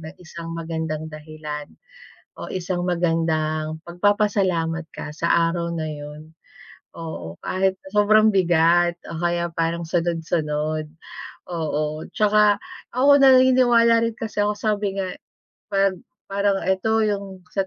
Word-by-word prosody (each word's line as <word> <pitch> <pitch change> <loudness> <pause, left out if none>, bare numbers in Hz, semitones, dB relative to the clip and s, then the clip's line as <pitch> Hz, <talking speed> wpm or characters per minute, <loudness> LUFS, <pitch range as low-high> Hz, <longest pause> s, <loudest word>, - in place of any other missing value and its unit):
ng 160 +2 -9
isang 165 0 -8
magandang 160 -1 -4
dahilan, 150 -1 -7 0.7
o - - -7
isang 180 -1 -2
magandang 160 -3 0
pagpapasalamat 180 -3 +1
ka - - -7
sa 170 +1 0 0.2
araw 170 -1 -3
na 160 -1 -3
yun. 150 +1 -9 0.6
Oo. 160 - -7
Kahit 190 0 0
sobrang 215 +2 +4
bigat 175 -2 +3 0.2
o 165 - -5
kaya 170 0 0
parang 165 +1 -1
sunod-sunod, 160 -3 -1 0.6
oo. 155 -2 -2
'Tsaka 210 -1 +4 0.3
ako 280 +3 +5
naniniwala 250 -3 +5
rin 230 - -2
kasi 220 -2 -2
ako 210 - +1
sabi 205 -2 -1
nga, 185 - -3 0.6
'pag 195 -2 +1 0.3
parang 200 0 +2
eto 220 +4 +1
yung 200 -3 -3
sa 195 -1 0
175 Hz, 120 wpm, -22 LUFS, 160-205 Hz, 0.7 s, ako